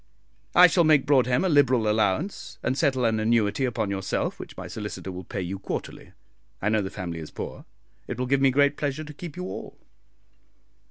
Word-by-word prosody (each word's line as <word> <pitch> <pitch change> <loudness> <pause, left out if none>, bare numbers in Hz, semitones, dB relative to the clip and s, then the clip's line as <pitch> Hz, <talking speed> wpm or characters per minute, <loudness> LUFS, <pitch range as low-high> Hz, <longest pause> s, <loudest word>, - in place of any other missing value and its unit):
"I 180 - +10
shall 175 0 +4
make 155 -3 +4
Broadhem 130 +2 +3
a - - +3
liberal 130 -8 +3
allowance, 110 - 0
and 130 - 0
settle 135 -4 +1
an 110 -1 +2
annuity 110 +2 +2
upon 110 -5 -1
yourself, 95 -1 -2
which - - -9
my - - -6
solicitor 95 - -6
will 90 0 -7
pay 95 - -5
you 95 +2 -4
quarterly. - - -6 0.5
I 105 - 0
know 110 -1 +2
the 95 - -3
family 85 -4 -5
is 80 - -8
poor; - - -7 0.4
it - - -4
will 125 - -1
give 135 +2 +1
me 135 - +5
great 140 +2 +3
pleasure 145 +1 -2
to 150 -1 -9
keep 160 +1 -9
you - - -4
all." 95 +1 -7
125 Hz, 200 wpm, -26 LUFS, 100-145 Hz, 0.5 s, I